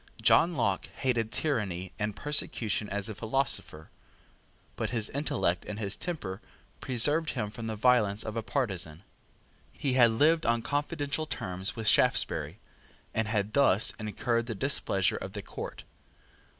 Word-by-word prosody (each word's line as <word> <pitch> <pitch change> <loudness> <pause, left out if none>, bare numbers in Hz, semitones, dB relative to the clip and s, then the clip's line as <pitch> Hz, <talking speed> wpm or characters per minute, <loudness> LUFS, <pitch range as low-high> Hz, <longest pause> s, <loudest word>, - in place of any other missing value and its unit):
John 170 -1 +4
Locke 100 -6 0
hated 120 -4 0
tyranny 105 - -1
and 105 -1 -2
persecution 115 -7 0
as 100 -1 -3
a 110 - -4
philosopher; 110 - -2 0.8
but - - -2
his 115 -3 +2
intellect 135 - 0
and 105 - -5
his 105 -2 -2
temper 105 - -5 0.4
preserved 145 +6 +2
him 105 -5 -3
from 115 +1 -6
the 110 - -3
violence 110 -3 +3
of 110 0 -5
a 115 - -1
partisan. 95 - -2 0.7
He 135 -3 -2
had 120 -2 +6
lived 155 +8 +3
on 115 0 +2
confidential 145 +1 -2
terms 95 -6 -2
with 110 -2 -4
Shaftesbury, - - +3 0.6
and 110 -1 0
had 105 -1 -1
thus 115 -7 +4
incurred 115 +2 -1
the 115 - -3
displeasure 100 -5 +1
of - - -7
the - - -6
court. - - -7
115 Hz, 145 wpm, -29 LUFS, 105-135 Hz, 0.8 s, had